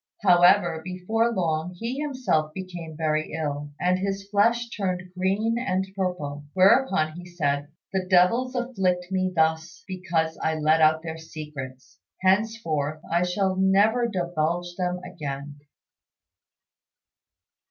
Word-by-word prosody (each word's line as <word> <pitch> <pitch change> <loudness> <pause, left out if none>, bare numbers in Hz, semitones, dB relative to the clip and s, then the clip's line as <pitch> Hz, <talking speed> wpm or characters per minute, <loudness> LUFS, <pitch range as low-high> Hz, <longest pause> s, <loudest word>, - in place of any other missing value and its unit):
However, 175 -2 +5
before 200 +6 0
long 175 -3 -1
he 235 +8 -4
himself 255 - -1
became 175 -4 -7
very 155 -1 -1
ill, 145 -2 -3
and 180 +1 +2
his 195 0 -3
flesh 235 +3 +3
turned 185 -4 -3
green 205 +5 0
and 190 -6 0
purple; 150 -7 -3
whereupon 190 -4 +4
he 175 +3 -9
said, 145 -5 -1 0.3
"The 190 -1 -1
devils 200 +8 +3
afflict 190 -8 -1
me 185 -1 0
thus 160 +2 0
because 170 -4 -2
I 160 - 0
let 155 +1 +3
out 155 +1 +4
their 160 -1 -6
secrets. 130 -8 -9 0.2
Henceforth 185 -7 +1
I 170 +1 +3
shall 185 +1 0
never 205 +5 +3
divulge 175 -3 -2
them 180 -1 -2
again." 145 -5 -6
180 Hz, 120 wpm, -25 LUFS, 160-195 Hz, 0.3 s, However